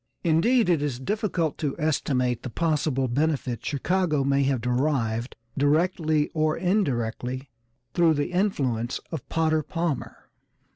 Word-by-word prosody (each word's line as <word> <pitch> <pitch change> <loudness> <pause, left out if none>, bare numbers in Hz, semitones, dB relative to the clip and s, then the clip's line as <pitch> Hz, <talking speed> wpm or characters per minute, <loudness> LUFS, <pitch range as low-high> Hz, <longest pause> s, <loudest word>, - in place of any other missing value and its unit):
Indeed, 205 +8 +3
it 170 -5 +3
is 140 -4 -2
difficult 180 -1 -1
to 145 -4 -1
estimate 125 -5 0
the - - -5
possible 150 -2 0
benefit 130 -3 -1
Chicago 155 +1 0
may 140 0 +2
have 135 -2 +1
derived, 125 -1 0 0.2
directly 155 +1 +2
or 155 0 0
indirectly, 130 - -1 0.4
through 165 -2 +4
the 145 +4 -1
influence 135 - 0
of 160 -6 -6
Potter 160 -1 +2
Palmer. 165 -2 -4
150 Hz, 125 wpm, -26 LUFS, 130-165 Hz, 0.4 s, through